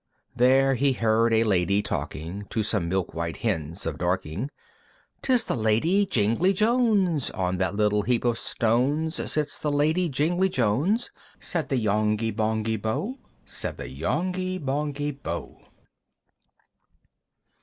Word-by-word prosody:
There 135 +2 +4
he 135 +2 +2
heard 115 -1 +2
a 110 0 +4
Lady 100 -1 +2
talking, 85 +6 -4
To 110 - -1
some 100 -5 +1
milk 95 0 -1
white 85 0 -3
Hens 85 -4 -2
of 80 -2 -3
Dorking, 90 - -2 0.7
"'Tis 250 -3 +2
the - - -1
Lady 130 - +2
Jingly 115 - +2
Jones! 210 - +2
"On 90 -1 -2
that 95 0 0
little 105 0 +2
heap 120 +3 0
of 120 -1 +1
stones 140 +8 0
"Sits 150 -2 -2
the 150 - 0
Lady 155 +5 +2
Jingly 175 +7 +1
Jones!" 145 - +1 0.3
Said 165 -3 -3
the 135 - +1
Yonghy 110 0 +1
Bonghy 110 0 0
Bò, 190 - -3 0.3
Said - - -5
the - - -6
Yonghy 185 - -2
Bonghy 145 0 -2
Bò. 85 - -5
III. - - -27
115 Hz, 135 wpm, -26 LUFS, 105-155 Hz, 0.7 s, There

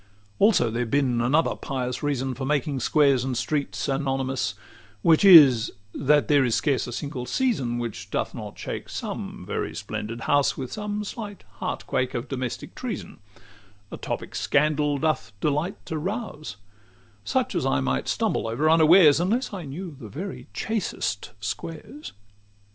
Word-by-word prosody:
XXVI 105 - -32 0.3
Also 200 - +4
there 120 +2 -1
bin 130 -2 +1
another 145 +7 +2
pious 125 -3 -4
reason 135 -3 -1
For 135 - -6
making 140 0 0
squares 140 -3 +3
and 130 -2 -2
streets 120 -3 -2
anonymous; 135 -1 -1 0.5
Which 160 +1 +5
is, 145 - +8 0.2
that 145 -2 +3
there 145 -2 +4
is 120 -3 +1
scarce 135 -6 +1
a - - -5
single 125 -1 -5
season 135 - 0
Which 120 -3 -5
doth - - -2
not - - -8
shake - - -6
some - - -5
very - - -3
splendid 110 +2 -5
house 145 +2 +2
With 130 -2 -5
some 210 0 -3
slight 205 - -7
heart - - -4
quake 130 0 -1
of 120 - -3
domestic 130 -3 -4
treason 235 - -6 0.7
A - - -6
topic - - -5
scandal 150 0 +1
doth 155 -5 -1
delight 150 - 0
to 160 - -3
rouse: 190 - -4 0.7
Such - - -1
I 65 - +2
might 65 - -1
stumble - - 0
over 145 +8 +2
unawares, 160 -1 +7
Unless 215 +8 0
I 185 -5 -5
knew 160 +3 -7
the 110 - -9
very 185 - -7
chastest 200 - -2
squares. 165 - -6
145 Hz, 155 wpm, -25 LUFS, 125-165 Hz, 0.7 s, is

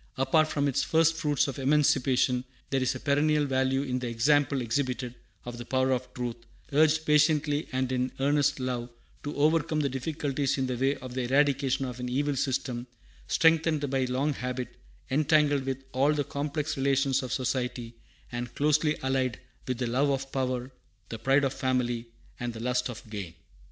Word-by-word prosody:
Apart 155 +4 +3
from 145 -2 0
its 135 - +1
first 165 0 +3
fruits 150 -3 +1
of 140 -1 -5
emancipation, 130 -3 +2 0.3
there 135 -1 +1
is 130 - 0
a - - -5
perennial 150 +1 +2
value 135 0 +1
in 130 -2 -2
the 125 - -4
example 140 +4 +2
exhibited 125 0 -2 0.3
of 120 -1 -7
the - - -5
power 130 +1 +1
of 125 0 -1
truth, 120 -2 -3 0.4
urged 155 +2 +4
patiently 150 0 +3
and 130 0 -1
in 130 0 0
earnest 145 +1 +2
love, 125 -1 -3 0.3
to 145 - -5
overcome 155 +1 +2
the 140 - 0
difficulties 140 0 -1
in 135 - 0
the 130 -1 -2
way 135 +3 +1
of 130 -1 -9
the 130 - -2
eradication 135 +1 +2
of 125 -1 -6
an 125 0 -3
evil 145 +3 0
system, 125 -2 -2 0.4
strengthened 160 -2 +3
by 135 -1 +1
long 135 +4 0
habit, 125 -1 -4 0.4
entangled 145 -1 +3
with 135 0 -3
all 135 +3 +3
the 145 -1 0
complex 145 +2 -3
relations 135 0 +2
of 130 -3 -6
society, 125 -1 -2 0.4
and 120 -1 -5
closely 150 +1 +2
allied 130 -2 0 0.3
with 130 -2 -1
the 125 - -1
love 130 +5 +1
of 135 0 -2
power, 130 -1 -2 0.4
the 115 - -6
pride 135 +5 +3
of 135 -1 0
family, 120 -2 -1 0.3
and 120 -1 -3
the 115 - -8
lust 125 +2 0
of 115 -2 -8
gain. 95 -6 -6
135 Hz, 175 wpm, -28 LUFS, 125-145 Hz, 0.4 s, urged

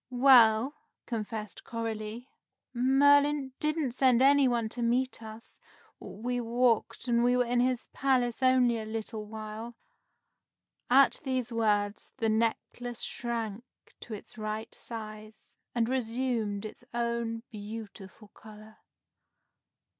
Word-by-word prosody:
"Well," 245 -1 +6 0.3
confessed 220 -2 -5
Coralie, 225 +1 -5 0.5
"Merlin 280 +2 +4
didn't 305 -3 0
send 255 -1 +3
any 275 +1 +5
one 235 -2 0
to 240 - -6
meet 245 +2 0
us. 220 +1 -11 0.4
We 245 +4 -4
walked, 235 0 +1
and 235 -1 +3
we 245 +1 +3
were 250 - +2
in 240 +1 +1
his 250 0 +1
palace 255 -3 +1
only 255 -3 +4
a 220 - -5
little 220 -1 -5
while." 220 +2 -7 1.1
At 270 +2 +5
these 255 -3 -2
words, 210 -2 0
the 225 - 0
necklace 230 +2 -2
shrank 230 -2 -3 0.4
to 225 - -7
its 210 - -12
right 215 +1 -4
size, 215 -1 -9 0.2
and 230 -1 +2
resumed 230 -4 -1
its 215 - -9
own 235 -1 -2
beautiful 210 -1 -9
color. 215 0 -14
235 Hz, 115 wpm, -29 LUFS, 220-250 Hz, 1.1 s, Well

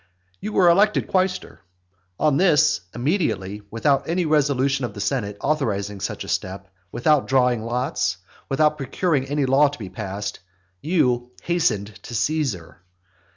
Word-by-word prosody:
You 210 - -5
were 180 - +4
elected 205 +5 +3
quaestor. 185 0 -1 0.6
On 150 -2 +3
this, 155 - +4
immediately, 120 - -1
without 135 +8 +1
any 175 +1 +1
resolution 140 -3 +1
of 120 - -4
the - - -7
senate 100 -1 -2
authorizing 105 -9 -1
such - - -4
a - - -10
step, 95 +1 -4 0.2
without 150 +2 +2
drawing 125 -3 +2
lots, 120 -5 -1 0.3
without 150 +2 +2
procuring 140 +1 0
any 145 0 0
law 135 +3 +5
to 145 +1 -6
be 100 -5 -7
passed, 100 +1 -5 0.4
you 125 -8 +1
hastened 110 - 0
to 120 - -8
Caesar. 110 - -2
135 Hz, 140 wpm, -23 LUFS, 105-155 Hz, 0.6 s, law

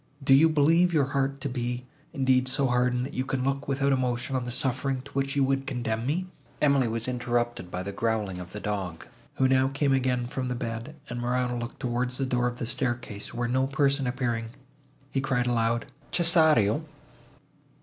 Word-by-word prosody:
Do 135 - +5
you 155 +4 +7
believe 165 +4 +4
your 150 -5 +3
heart 140 0 0
to 140 - -1
be, 125 -1 -3 0.3
indeed, 130 -3 +2
so 135 +1 +2
hardened, 125 0 +1
that 140 - -8
you 130 - -1
can 135 -1 -2
look 135 +1 -1
without 140 0 +1
emotion 130 +1 -1
on 125 -2 -1
the 125 - -4
suffering, 130 +1 -1
to 140 - -13
which 135 0 -1
you 140 - +3
would 135 0 0
condemn 120 -3 -2
me?—" 175 +6 0 0.3
Emily 140 -4 +3
was 115 +1 -2
interrupted 120 -5 -1
by 90 +1 -4
the 100 - -4
growling 105 -3 -1
of 90 -1 -8
the 105 - -6
dog, 100 -6 -4 0.3
who 130 - +3
now 130 0 +4
came 140 0 +1
again 125 -2 +1
from 130 +1 -3
the 125 - -2
bed, 115 +4 -5
and 120 0 -4
Morano 125 0 0
looked 120 +1 -6
towards 125 +1 -1
the 135 - 0
door 125 -1 +1
of 120 0 -4
the 120 - -3
staircase, 120 -4 -3
where 120 0 -2
no 130 +2 +1
person 140 -1 +1
appearing, 120 -3 -1 0.6
he 135 - 0
called 130 -2 0
aloud, 115 -1 +1 0.3
"Cesario!" 160 - +4
125 Hz, 195 wpm, -27 LUFS, 120-135 Hz, 0.6 s, you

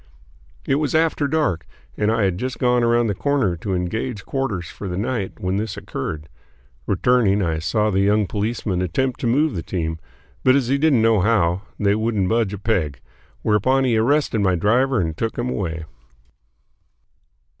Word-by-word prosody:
It 135 - +2
was 150 0 -1
after 160 -2 +2
dark 135 - 0 0.3
and 105 +1 +1
I 115 -2 +1
had 95 -2 0
just 130 0 -3
gone 125 -1 +2
around 120 0 +3
the 105 - 0
corner 130 -5 0
to 95 +3 -3
engage 100 +5 -3
quarters 120 -10 -2
for 100 - -8
the 90 -1 -4
night 105 -1 -3
when 95 +1 -1
this 110 +2 -3
occurred. 75 +2 -5 0.6
Returning, 110 -5 +2
I 80 -2 -1
saw 105 +6 0
the 95 - +1
young 105 +2 +3
policeman 105 -2 -2
attempt 125 +9 -1
to 120 - -1
move 145 +5 +2
the 85 - -3
team, 80 -2 -3 0.4
but 130 0 +5
as 130 -4 +1
he 140 +1 +2
didn't 140 -7 +3
know 115 -2 +4
how, 95 -3 +2 0.2
they 100 -1 +3
wouldn't 110 -3 0
budge 115 -3 +1
a 105 - -4
peg, 85 - -1 0.4
whereupon 130 +6 +2
he 125 -3 +2
arrested 120 +1 +2
my 95 -2 +2
driver 120 +8 +2
and 80 -3 -1
took 115 +6 -3
him 125 +1 -1
away. 80 -7 -3
110 Hz, 175 wpm, -21 LUFS, 95-125 Hz, 0.6 s, but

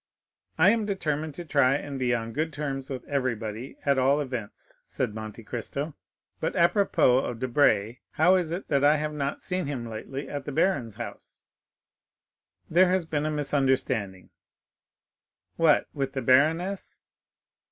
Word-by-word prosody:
"I 180 +5 +6
am 220 -2 0
determined 155 -6 -2
to 175 - -7
try 140 -3 +3
and 140 -1 -4
be 125 -1 +1
on 115 -1 -2
good 160 +5 -1
terms 140 -2 -4
with 130 -2 -5
everybody, 120 -3 -3
at 140 -2 +3
all 135 +3 +3
events," 125 -7 -6
said 105 - -3
Monte 110 +1 -7
Cristo. 140 +7 -4 0.5
"But 160 - -2
apropos 170 - +4
of 125 -3 -3
Debray, 120 -2 +2
how 165 +4 +4
is 180 -4 +2
it 175 +4 -4
that 140 -2 +2
I 145 +1 +6
have 150 0 -2
not 140 -1 -3
seen 180 -4 -2
him 130 -5 -4
lately 115 +5 -6
at 145 -1 -5
the - - -4
baron's 135 - 0
house?" - - -8 1.2
"There 180 +3 +4
has 185 -2 +1
been 155 -1 -1
a - - 0
misunderstanding." 130 -10 0 1.2
"What, 165 -3 +4
with 135 -2 -3
the 135 - -3
baroness?" 160 +10 +2
140 Hz, 150 wpm, -27 LUFS, 125-160 Hz, 1.2 s, I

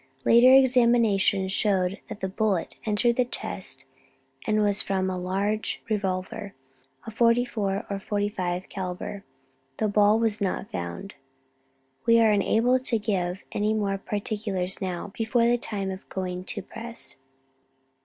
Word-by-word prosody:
Later 240 +2 +7
examinations 235 -7 +4
showed 190 -2 +1
that 215 - -8
the 190 - -1
bullet 195 -2 -1
entered 235 +3 +2
the 250 - +3
chest 245 - -5 0.6
and 215 -1 +2
was 205 -1 +2
from 190 -1 -1
a - - -2
large 200 +4 -2
revolver, 195 0 -2 0.5
a 225 - -6
44 230 -3 +1
or 200 -1 -3
45 195 -3 -2
calibre. 190 +1 -5 0.6
The 215 - +1
ball 210 +1 +4
was 225 -2 0
not 190 -2 -2
found. 90 - -5 0.9
"We 230 0 +6
are 225 -1 +5
unable 225 +5 +3
to 250 -2 +1
give 190 -4 -2
any 215 +1 0
more 200 -2 -1
particulars 205 -3 -3
now, 185 +1 -4
before 230 +1 +1
the 240 +1 +3
time 195 -4 -3
of 190 +1 -9
going 185 -1 -4
to 205 - -4
press." 230 +3 -9
205 Hz, 135 wpm, -26 LUFS, 190-225 Hz, 0.9 s, Later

